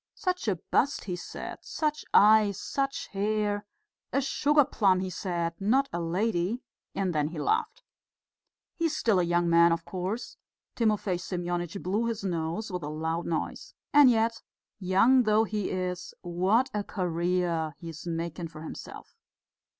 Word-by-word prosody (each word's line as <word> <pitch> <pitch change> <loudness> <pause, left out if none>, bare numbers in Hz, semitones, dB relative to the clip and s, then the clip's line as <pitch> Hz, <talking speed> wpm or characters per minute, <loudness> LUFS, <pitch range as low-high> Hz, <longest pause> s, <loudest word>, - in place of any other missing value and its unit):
Such 365 -6 -2
a 200 - +2
bust, 260 - 0
he 180 -3 -3
said, 175 - -7
such 305 -1 -2
eyes, 210 -1 +6
such 275 0 -2
hair.... 205 0 -1 0.4
A - - +2
sugar 290 +2 +3
plum, 190 -6 +2
he 185 0 -3
said, 170 -2 -2
not 260 +8 +2
a 170 - -1
lady 185 +5 -1 0.3
and 190 -2 0
then 150 -1 +1
he 160 +1 -7
laughed. 150 - -1 0.9
He 335 - -2
is 310 -1 0
still 215 -5 +3
a - - +3
young 175 0 +1
man, 170 0 +6
of 165 0 -1
course." 190 +5 -4 0.4
Timofey 210 -5 +1
Semyonitch 175 0 -3
blew 210 +6 0
his 225 -3 -3
nose 175 +3 -2
with 180 -1 -3
a 150 - -4
loud 160 +2 -2
noise. 165 -2 -3 0.2
"And 290 -3 +8
yet, 230 -1 +1 0.4
young 200 +8 +4
though 215 -1 +3
he 210 -3 -2
is, 180 -1 -3
what 190 +9 +1
a 210 -1 -1
career 175 -4 -1
he 170 - -8
is 160 +2 -9
making 165 0 -3
for 160 -1 -11
himself." - - -9
185 Hz, 160 wpm, -28 LUFS, 170-220 Hz, 0.9 s, And